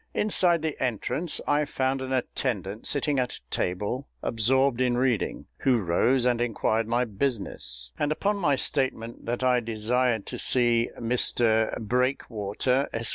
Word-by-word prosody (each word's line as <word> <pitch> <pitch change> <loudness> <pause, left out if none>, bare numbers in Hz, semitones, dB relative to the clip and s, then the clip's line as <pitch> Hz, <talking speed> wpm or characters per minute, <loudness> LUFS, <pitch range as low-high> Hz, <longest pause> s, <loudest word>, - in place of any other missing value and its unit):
Inside 175 -6 +3
the 160 -2 -3
entrance 130 - -1
I 145 +1 +3
found 135 -2 -1
an 130 0 -5
attendant 115 -5 -2
sitting 145 -1 +1
at 125 -1 -1
a - - -12
table 105 +9 -2 0.2
absorbed 130 +3 +2
in 125 -1 +2
reading, 125 -4 0
who 130 -2 +3
rose 115 +7 +2
and 120 -1 +2
inquired 115 -1 0
my 120 +2 +1
business, 95 - -3
and 150 - 0
upon 200 +6 0
my 150 -8 +2
statement 125 -5 -2
that 120 +2 -2
I 125 -1 +4
desired 115 0 0
to - - -6
see 120 -2 +3
Mr 115 -1 +2
BREAKWATER, 125 +1 0
Esq. 115 0 -1
125 Hz, 145 wpm, -26 LUFS, 115-135 Hz, 0.2 s, I